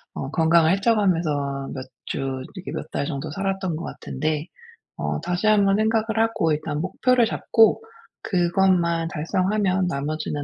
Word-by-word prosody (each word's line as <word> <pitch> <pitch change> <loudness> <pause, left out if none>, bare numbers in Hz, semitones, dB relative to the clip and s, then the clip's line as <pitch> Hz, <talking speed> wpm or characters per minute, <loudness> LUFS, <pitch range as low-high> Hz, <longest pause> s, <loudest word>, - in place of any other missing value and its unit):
어 135 - -4
건강을 165 0 +4
해쳐 205 +4 +2
가면서 150 -8 0
몇 130 -1 -6 0.2
주 - - -4
이렇게 135 +8 -5
몇 - - -6
달 - - -1
정도 145 0 -4
살았던 195 0 -2
것 170 - -6
같은데 155 +3 -3 0.5
어 - - -2
다시 175 +5 -1
한번 200 -2 +4
생각을 220 0 +1
하고 215 -8 +1
일단 150 0 -3
목표를 245 +7 +2
잡고 225 -1 +3 0.4
그것만 175 -2 +2
달성하면 185 +3 0
나머지는 150 -1 -3
175 Hz, 305 characters per minute, -23 LUFS, 155-200 Hz, 0.5 s, 건강을